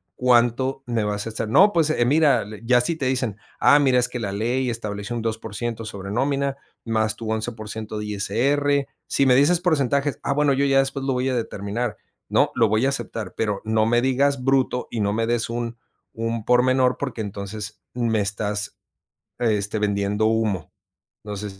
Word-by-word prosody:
cuánto 125 +2 +2
me 120 -3 -1
vas 105 0 -2
a - - -3
estar", 110 0 -3
"No, 200 - +6
pues, 165 -3 +2
eh, 120 -6 +2
mira 145 +2 +4
el", 105 +2 -10
ya 125 +1 +5
si 165 +7 -1
te 140 -5 -2
dicen: 125 -5 -1 0.2
"Ah, 145 - +6
mira, 135 -3 +3
es 125 - +2
que 125 - -5
la 105 -4 -3
ley 120 +5 0
establece 105 -2 -4
un 115 - -2
2% 115 +1 -4
sobre 100 -2 -7
nómina 140 +3 0 0.3
más 110 -2 0
tu 110 -1 -5
11% 110 -1 -4
de 105 - -4
ISR", 135 +8 +1 0.2
"Si 140 - +2
me 130 - +5
dices 145 +6 +4
porcentajes, 140 -4 +1
ah, 140 - 0
bueno, 145 0 +2
yo 140 +1 +1
ya 135 -1 +3
después 135 0 -1
lo 135 - +1
voy 125 +1 0
a 130 - 0
determinar", 110 0 -3 0.3
¿no?, - - +3
"Lo 115 - +4
voy 110 +4 +2
a - - +3
aceptar, 115 -7 -4
pero 105 -3 -1
no 110 0 +2
me 120 +1 +3
digas 135 +1 +1
bruto 130 -1 +1
y 115 - -3
no 100 0 +1
me 115 +1 0
des 120 -1 0
un 120 0 -4 0.4
un 115 -1 -3
por 125 0 +5
menor, 130 0 +2
porque 130 -5 -3
entonces, 105 +1 -6
me 115 -3 +1
estás, 105 +1 -2 0.6
este, 105 -2 0
vendiendo 105 0 0
humo". 110 -6 0 0.6
Entonces, 105 -1 -6
115 Hz, 190 wpm, -23 LUFS, 105-130 Hz, 0.6 s, No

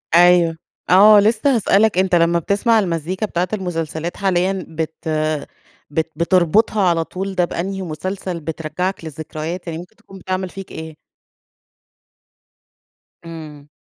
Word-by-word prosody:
أيوه، 175 -1 +5 0.3
آه، 205 +3 +8
لسّه 225 +6 +3
هاسألك 215 -2 +3
أنت 185 -1 +3
لمّا 170 0 +3
بتسمع 205 +6 +2
المزيكا 180 +1 -2
بتاعة 180 -3 -1
المسلسلات 170 -4 -3
حاليًا، 190 -1 0
بت 160 0 -4 1.0
بت 160 +2 -2
بتربطها 185 +6 +2
على 165 -1 +1
طول 190 +3 -5
ده 180 -1 +3
بأنهي 190 +3 -4
مسلسل، 185 +2 -4
بترجّعك 165 +4 -4
للذكريات، 160 +3 -6
يعني 165 -1 -4
ممكن 180 +5 -12
تكون 195 -4 -14
بتعمل 185 +1 -3
فيك 195 +1 -9
إيه؟ 160 -1 -8 2.3
إمم. 155 -3 -10
180 Hz, 120 wpm, -19 LUFS, 165-195 Hz, 2.3 s, آه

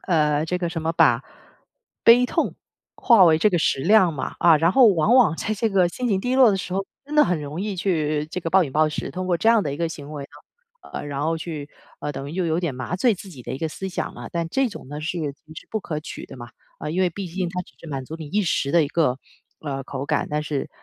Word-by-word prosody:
呃， 150 -2 +2
这 180 - -1
个 175 -2 -2
什 165 -2 -4
么 160 +1 -1
把 125 -6 +3 0.8
悲 240 +2 +7
痛， - - -1 0.4
化 225 -7 +6
为 160 -1 +5
这 210 +6 +3
个 175 - +1
食 145 - +1
量 185 +1 +4
嘛， 135 - -5
啊， 165 -2 +6
然 165 +4 +2
后 260 -3 +7
往 195 +4 +3
往 220 -11 +5
在 215 - -2
这 220 +2 0
个 190 -4 +3
心 250 +6 -3
情 195 - +2
低 250 +6 -1
落 260 -4 +7
的 195 - +1
时 185 -1 -5
候， 195 +1 -2 0.2
真 290 +2 -7
的 300 - +7
很 175 -4 -1
容 150 +5 -5
易 205 -1 -3
去 155 -5 0
这 180 - -4
个 165 - -3
暴 190 +1 +4
饮 135 - -7
暴 155 0 +3
食。 150 - -4
通 185 0 -4
过 175 -2 +2
这 225 - +3
样 225 -3 +4
的 145 - -2
一 - - -7
个 170 +2 -1
行 150 -2 -8
为 145 -2 -5
呢， 470 - -20
呃， - - -5
然 140 -1 -4
后 165 +1 0
去 155 -3 -6 0.3
呃， 145 - -3
等 135 -1 -6
于 - - -8
又 185 -2 0
有 160 +1 0
点 170 -7 -2
麻 130 +8 -4
醉 230 +3 +3
自 195 +1 -11
己 140 -9 -11
的 - - -6
一 130 - -4
个 160 - -2
思 190 +5 -6
想 - - -4
了。 - - -9
但 170 -1 -2
这 270 +8 +1
种 205 - -10
呢 145 +1 -6
是 175 +3 -3
肯 145 -4 -3
定 155 0 -14
是 - - -10
不 220 - -1
可 155 -6 -5
取 155 - -8
的 - - -12
嘛， 120 -1 -9 0.3
啊， - - -5
因 175 +5 0
为 180 - +2
毕 195 +3 -6
竟 180 +1 -2
它 180 +1 -3
只 130 - -12
是 165 - -13
满 135 -3 -4
足 160 - -7
你 160 - -8
一 205 +7 +1
时 145 -5 0
的 170 - +5
一 145 - -2
个， 145 -5 +1 0.4
呃， 135 -3 -4
口 135 0 -5
感。 - - 0
但 150 0 -1
是， 150 -2 -3
165 Hz, 305 characters per minute, -23 LUFS, 150-190 Hz, 0.8 s, 悲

